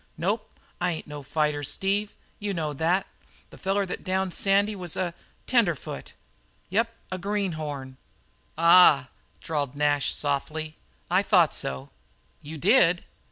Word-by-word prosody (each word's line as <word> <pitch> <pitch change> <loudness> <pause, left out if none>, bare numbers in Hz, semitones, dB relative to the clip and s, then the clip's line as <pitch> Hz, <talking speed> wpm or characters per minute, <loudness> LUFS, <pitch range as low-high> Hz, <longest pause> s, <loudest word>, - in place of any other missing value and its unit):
"Nope. 205 +7 -2 0.2
I 180 0 +1
ain't 160 - -6
no 150 -1 -8
fighter, 150 +1 0
Steve. 200 +7 -1 0.2
You 205 -2 -3
know 155 -3 -2
that. 165 +6 +1 0.5
The - - -13
feller 195 +1 0
that 185 - -6
downed 190 -1 -1
Sandy 200 +2 +2
was 180 -4 -5
a 175 -2 -2 0.3
tenderfoot. 205 - 0 0.6
Yep, 225 +4 +1 0.2
a 185 - -3
greenhorn." 155 -9 -3 0.6
"Ah 170 -3 +7
h - - -16 0.4
h," - - -16
drawled 145 -4 -2
Nash 145 -1 +1
softly, 155 +2 -2 0.4
"I - - +4
thought - - +4
so." 65 +1 -3 0.5
"You 155 +2 -8
did?" 180 - +4
170 Hz, 140 wpm, -26 LUFS, 150-195 Hz, 0.6 s, Ah